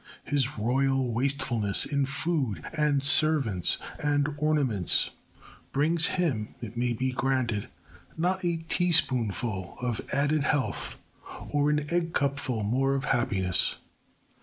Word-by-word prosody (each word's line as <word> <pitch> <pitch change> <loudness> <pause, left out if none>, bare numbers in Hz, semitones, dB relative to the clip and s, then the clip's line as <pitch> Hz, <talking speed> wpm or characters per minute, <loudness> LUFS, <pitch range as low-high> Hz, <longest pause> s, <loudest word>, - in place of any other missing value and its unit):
His 140 -3 -1
royal 130 +3 +1
wastefulness 120 -5 +2
in 140 -2 0
food 140 - -1
and 150 -3 +1
servants 140 - +3 0.3
and 145 0 +1
ornaments 140 - +1 0.6
brings 160 +4 +2
him, 130 -12 -1
it 115 -1 -8
may 120 +1 0
be 130 +3 -1
granted, 130 -5 -1 0.5
not 185 +3 0
a 170 -1 0
teaspoonful 125 - 0
of 120 -3 -2
added 145 +1 +1
health 145 -3 -1 0.5
or 145 0 +2
an 150 0 +2
eggcupful 140 -9 -1
more 135 +5 +1
of 135 - -2
happiness. 100 -8 +1
135 Hz, 110 wpm, -27 LUFS, 120-150 Hz, 0.6 s, servants